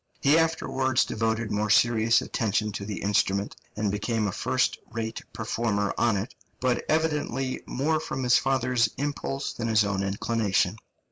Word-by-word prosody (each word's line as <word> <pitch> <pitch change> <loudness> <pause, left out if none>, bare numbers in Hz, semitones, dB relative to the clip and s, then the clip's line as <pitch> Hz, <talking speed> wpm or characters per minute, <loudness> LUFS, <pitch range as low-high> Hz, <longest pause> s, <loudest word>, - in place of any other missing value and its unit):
He 140 +2 +4
afterwards 135 -6 +1
devoted 110 0 -1
more 105 +1 0
serious 115 +1 +4
attention 105 -1 -1
to 100 0 -5
the 105 -1 -5
instrument, 100 0 +1 0.2
and 105 -1 0
became 105 +2 -1
a - - -1
first - - 0
rate 110 0 -4
performer 110 -2 -1
on 115 -4 +2
it, 100 +5 -4 0.3
but 125 -1 +1
evidently 150 -4 0
more 155 +4 0
from 135 -4 -4
his 120 -1 +5
father's 125 -3 +1
impulse 140 -1 -3
than 115 - -3
his 110 -2 +3
own 100 -1 -1
inclination. 100 -1 0
115 Hz, 150 wpm, -26 LUFS, 105-130 Hz, 0.3 s, his